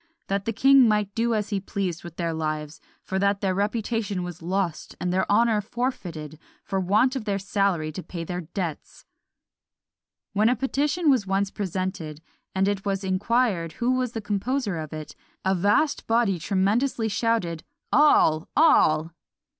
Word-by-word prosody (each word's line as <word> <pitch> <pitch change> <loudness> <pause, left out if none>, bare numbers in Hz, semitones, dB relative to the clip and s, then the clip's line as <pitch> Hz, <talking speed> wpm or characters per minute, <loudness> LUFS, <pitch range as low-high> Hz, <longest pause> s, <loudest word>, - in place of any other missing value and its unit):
that 195 0 -2
the 230 - 0
king 270 +2 +6
might 210 -2 +1
do 230 +1 +1
as 210 0 -2
he 200 -2 -1
pleased 190 -3 -3
with 170 -2 -9
their 170 -2 -2
lives; 155 -1 -4 0.2
for 190 - -2
that 200 0 +2
their 195 -2 0
reputation 210 -1 -1
was 175 -1 -7
lost, 180 -1 -2
and 180 0 -1
their 190 - 0
honour 225 0 +3
forfeited, 175 - -4 0.2
for 195 -1 -2
want 215 +8 +2
of 250 -5 -4
their 200 -2 0
salary 195 -5 0
to 170 - -6
pay 170 0 -6
their 180 +2 -4
debts." 170 -1 -6 1.3
When 210 +3 +3
a 250 - +2
petition 285 +6 +1
was 235 -7 +1
once 195 +1 0
presented, 185 -5 -4 0.4
and 190 +1 +2
it 200 -1 -1
was 195 -1 -2
inquired 190 -2 0
who 245 0 0
was 255 -2 0
the 225 - -3
composer 210 +1 -1
of 155 -1 -6
it, 155 -1 -7 0.3
a 190 - +3
vast 205 - +1
body 225 -5 +2
tremendously 215 - +1
shouted 200 -7 -1 0.3
"All! 165 - +4
all!" 165 - +4
200 Hz, 160 wpm, -25 LUFS, 175-230 Hz, 1.3 s, king